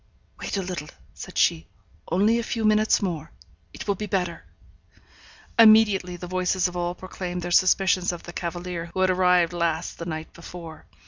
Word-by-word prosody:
'Wait -, -, -3 dB
a 195 Hz, -, -1 dB
little,' 180 Hz, -4 st, -5 dB, 0.2 s
said -, -, -9 dB
she. 80 Hz, -1 st, +2 dB, 0.4 s
'Only 210 Hz, +6 st, +3 dB
a -, -, -2 dB
few 225 Hz, -1 st, -2 dB
minutes 215 Hz, 0 st, +3 dB
more. 165 Hz, -4 st, -3 dB, 0.4 s
It -, -, -9 dB
will 200 Hz, -, +2 dB
be 210 Hz, +2 st, -5 dB
better.' 180 Hz, -4 st, -2 dB, 1.2 s
Immediately 215 Hz, -5 st, +6 dB
the 180 Hz, -, -7 dB
voices 185 Hz, +1 st, 0 dB
of 180 Hz, -, -8 dB
all 175 Hz, 0 st, -2 dB
proclaimed 180 Hz, -1 st, -6 dB
their 175 Hz, -, -4 dB
suspicions 185 Hz, 0 st, +3 dB
of 175 Hz, -, -8 dB
the 175 Hz, -, -9 dB
cavalier 175 Hz, 0 st, -5 dB
who 190 Hz, -, 0 dB
had 185 Hz, 0 st, +4 dB
arrived 180 Hz, -2 st, +3 dB
last 170 Hz, -1 st, -2 dB
the 170 Hz, -, -5 dB
night 155 Hz, -1 st, -6 dB
before. 170 Hz, -1 st, -10 dB
180 Hz, 175 wpm, -25 LUFS, 170-190 Hz, 1.2 s, Immediately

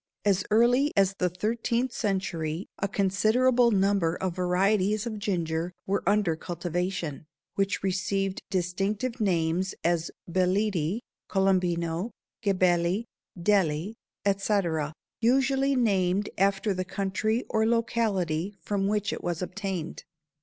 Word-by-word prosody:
As 195 Hz, -2 st, +3 dB
early 245 Hz, +6 st, +4 dB
as 195 Hz, -1 st, +4 dB
the 180 Hz, -, +2 dB
thirteenth 230 Hz, +6 st, -1 dB
century 185 Hz, -6 st, -2 dB
a 200 Hz, -, 0 dB
considerable 220 Hz, +6 st, +3 dB
number 195 Hz, -5 st, +2 dB
of 185 Hz, -2 st, -3 dB
varieties 195 Hz, +3 st, +2 dB
of 220 Hz, -3 st, -4 dB
ginger 170 Hz, -4 st, -1 dB
were 200 Hz, +1 st, 0 dB
under 200 Hz, -5 st, +3 dB
cultivation, 175 Hz, -2 st, -3 dB, 0.3 s
which 195 Hz, 0 st, -1 dB
received 195 Hz, 0 st, -1 dB
distinctive 195 Hz, +7 st, -1 dB
names 180 Hz, -1 st, +1 dB
as 170 Hz, -1 st, +1 dB, 0.2 s
Beledi, 185 Hz, +1 st, +1 dB, 0.3 s
Colombino, 180 Hz, -1 st, +1 dB, 0.3 s
Gebeli, 185 Hz, 0 st, +2 dB, 0.4 s
Deli, 175 Hz, -1 st, +1 dB, 0.3 s
etc., 195 Hz, -6 st, +1 dB, 0.3 s
usually 270 Hz, +3 st, +3 dB
named 200 Hz, -4 st, +1 dB
after 195 Hz, +1 st, +2 dB
the 185 Hz, 0 st, -2 dB
country 200 Hz, +5 st, -1 dB
or 220 Hz, 0 st, +1 dB
locality 205 Hz, -6 st, 0 dB
from 200 Hz, -1 st, -1 dB
which 210 Hz, 0 st, 0 dB
it -, -, -6 dB
was 175 Hz, 0 st, -2 dB
obtained. 190 Hz, -4 st, -4 dB
195 Hz, 110 wpm, -27 LUFS, 180-210 Hz, 0.4 s, early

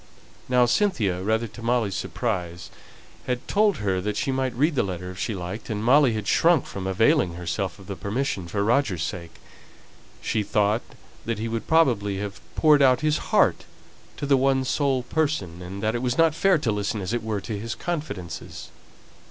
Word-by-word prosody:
Now 125 Hz, -1 st, +5 dB
Cynthia, 120 Hz, -, +1 dB
rather 110 Hz, +4 st, 0 dB
to 115 Hz, +3 st, -12 dB
Molly's 115 Hz, -4 st, +1 dB
surprise, 90 Hz, -8 st, -3 dB, 0.6 s
had 125 Hz, -1 st, -2 dB
told 210 Hz, -1 st, +3 dB
her 95 Hz, -3 st, -1 dB
that 105 Hz, +2 st, -2 dB
she 135 Hz, -, 0 dB
might 130 Hz, -2 st, -1 dB
read 150 Hz, +6 st, +2 dB
the 135 Hz, -, +2 dB
letter 90 Hz, -1 st, -4 dB
if 90 Hz, -, -10 dB
she 110 Hz, -, -2 dB
liked, 95 Hz, +6 st, -6 dB
and 105 Hz, -1 st, -2 dB
Molly 130 Hz, +1 st, +5 dB
had 105 Hz, -2 st, -4 dB
shrunk 165 Hz, -, +4 dB
from 95 Hz, -1 st, -6 dB
availing 105 Hz, -, +3 dB
herself 90 Hz, +2 st, -3 dB
of 95 Hz, -, -14 dB
the 100 Hz, -, -5 dB
permission, 100 Hz, -3 st, -2 dB
for 100 Hz, +4 st, -1 dB
Roger's 110 Hz, -, +1 dB
sake. 85 Hz, -2 st, -6 dB, 0.8 s
She 110 Hz, -, -1 dB
thought 105 Hz, +2 st, +1 dB, 0.4 s
that 115 Hz, -1 st, -2 dB
he 110 Hz, +2 st, -3 dB
would 115 Hz, 0 st, -4 dB
probably 115 Hz, -12 st, +2 dB
have 100 Hz, +1 st, -5 dB
poured 150 Hz, -2 st, +5 dB
out 130 Hz, -1 st, +5 dB
his 155 Hz, 0 st, +1 dB
heart -, -, +3 dB, 0.5 s
to -, -, -3 dB
the 140 Hz, -1 st, +4 dB
one 135 Hz, 0 st, +2 dB
sole 135 Hz, -2 st, +1 dB
person, 125 Hz, -, -1 dB
and 95 Hz, +3 st, -7 dB
that 110 Hz, +1 st, +1 dB
it 120 Hz, -, -2 dB
was 125 Hz, -1 st, -1 dB
not 165 Hz, -2 st, +4 dB
fair 190 Hz, +2 st, +3 dB
to 125 Hz, -7 st, -1 dB
listen, 105 Hz, +1 st, -2 dB
as 95 Hz, +3 st, -3 dB
it 120 Hz, -, 0 dB
were, 110 Hz, -2 st, -2 dB
to 105 Hz, 0 st, -5 dB
his 110 Hz, +1 st, -4 dB
confidences. 105 Hz, -, -5 dB
110 Hz, 190 wpm, -25 LUFS, 95-135 Hz, 0.8 s, Now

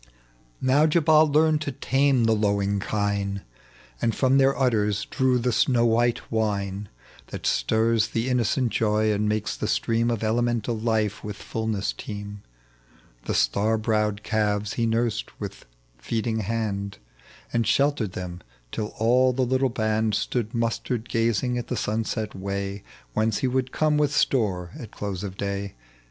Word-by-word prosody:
H -, -, -24 dB, 0.5 s
Now 140 Hz, +4 st, +4 dB
Jabal 155 Hz, -1 st, +5 dB
learned 155 Hz, +1 st, +3 dB
to 145 Hz, -, -2 dB
tame 135 Hz, 0 st, +2 dB
the 115 Hz, -, +3 dB
lowing 100 Hz, -2 st, +1 dB
kine, 100 Hz, -1 st, -1 dB, 0.6 s
And 115 Hz, -, +1 dB
from 135 Hz, 0 st, +3 dB
their' 135 Hz, 0 st, +3 dB
udders 105 Hz, -5 st, +1 dB
drew 130 Hz, -2 st, +1 dB
the 125 Hz, +1 st, 0 dB
snow 120 Hz, 0 st, +3 dB
white 120 Hz, +1 st, +1 dB
wine 100 Hz, -2 st, -1 dB, 0.4 s
That -, -, -7 dB
stirs 110 Hz, -, +2 dB
the 115 Hz, +2 st, -2 dB
innocent 125 Hz, 0 st, +1 dB
joy, 110 Hz, 0 st, +2 dB
and 105 Hz, +1 st, 0 dB
makes 110 Hz, 0 st, -1 dB
the -, -, -3 dB
stream 115 Hz, +1 st, +1 dB
Of 115 Hz, -2 st, -1 dB
elemental 120 Hz, +1 st, 0 dB
life 110 Hz, -2 st, -1 dB
with 105 Hz, -1 st, -5 dB
fulness 110 Hz, -1 st, -2 dB
teem; 105 Hz, -1 st, -7 dB, 0.8 s
The -, -, -1 dB
star 105 Hz, -, +2 dB
browed 105 Hz, -2 st, 0 dB
calves 105 Hz, -2 st, 0 dB
he 115 Hz, -1 st, 0 dB
nursed 115 Hz, -, -1 dB
with -, -, -7 dB, 0.3 s
feeding 110 Hz, -, -2 dB
hand, 100 Hz, -2 st, -2 dB, 0.6 s
And 115 Hz, -2 st, +1 dB
sheltered 140 Hz, -9 st, +1 dB
them, 90 Hz, -1 st, -6 dB, 0.3 s
till 105 Hz, -1 st, -4 dB
all 125 Hz, +3 st, +4 dB
the 130 Hz, +1 st, +1 dB
little 130 Hz, +1 st, +1 dB
band 110 Hz, -2 st, 0 dB
Stood 120 Hz, -1 st, -2 dB
mustered 115 Hz, 0 st, -2 dB
gazing 115 Hz, +2 st, +1 dB
at 120 Hz, -, -6 dB
the -, -, -2 dB
sunset 110 Hz, 0 st, -2 dB
way 100 Hz, +1 st, -4 dB, 0.3 s
Whence 110 Hz, -1 st, +1 dB
he -, -, +3 dB
would 130 Hz, 0 st, -1 dB
come 155 Hz, -1 st, +2 dB
with 145 Hz, -1 st, +2 dB
store 95 Hz, -12 st, +1 dB
at 115 Hz, -, -8 dB
close 100 Hz, -2 st, -5 dB
of 95 Hz, -1 st, -6 dB
day. 100 Hz, 0 st, -3 dB
110 Hz, 155 wpm, -25 LUFS, 105-125 Hz, 0.8 s, Jabal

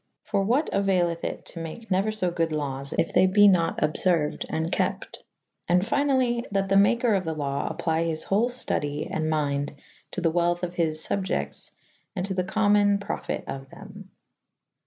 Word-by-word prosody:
For 205 Hz, -2 st, 0 dB
what 250 Hz, +9 st, +1 dB
auayleth 180 Hz, -4 st, +1 dB
it -, -, -4 dB
to 170 Hz, -, -7 dB
make 165 Hz, +8 st, -8 dB
neuer 195 Hz, +4 st, +2 dB
fo 185 Hz, -5 st, -1 dB
good 165 Hz, -2 st, -1 dB
lawes 140 Hz, -2 st, -3 dB
if 165 Hz, -, +1 dB
they 185 Hz, +1 st, +5 dB
be 205 Hz, +2 st, +6 dB
nat 175 Hz, -4 st, +3 dB
obferuyd 155 Hz, -1 st, +1 dB
and 160 Hz, +2 st, -2 dB
kepte. -, -, -2 dB, 0.5 s
And 180 Hz, +1 st, +3 dB
fynally 255 Hz, -1 st, +1 dB
that 195 Hz, -1 st, -1 dB
the 195 Hz, -, +3 dB
maker 230 Hz, +3 st, +4 dB
of 195 Hz, -2 st, +1 dB
the 160 Hz, -2 st, -3 dB
lawe 140 Hz, -2 st, -2 dB
apply 165 Hz, 0 st, -1 dB
his 160 Hz, -1 st, -1 dB
hole 215 Hz, +5 st, +1 dB
ftudye 150 Hz, -, -2 dB
and 155 Hz, 0 st, -1 dB
mynde 145 Hz, -2 st, -1 dB, 0.3 s
to 185 Hz, -, -5 dB
the 165 Hz, -2 st, +2 dB
welth 175 Hz, +1 st, +1 dB
of 175 Hz, -1 st, -2 dB
his 160 Hz, -3 st, +1 dB
fubiectes 190 Hz, -1 st, -2 dB, 0.5 s
and 185 Hz, -1 st, -2 dB
to 195 Hz, -, -3 dB
the 185 Hz, -1 st, 0 dB
commune 205 Hz, +1 st, +3 dB
[A -, -, +2 dB
vii 200 Hz, -, -9 dB
a] -, -, -14 dB
profyte -, -, -3 dB
of 135 Hz, 0 st, -7 dB
them. 200 Hz, +2 st, -12 dB
180 Hz, 190 wpm, -26 LUFS, 160-200 Hz, 0.5 s, be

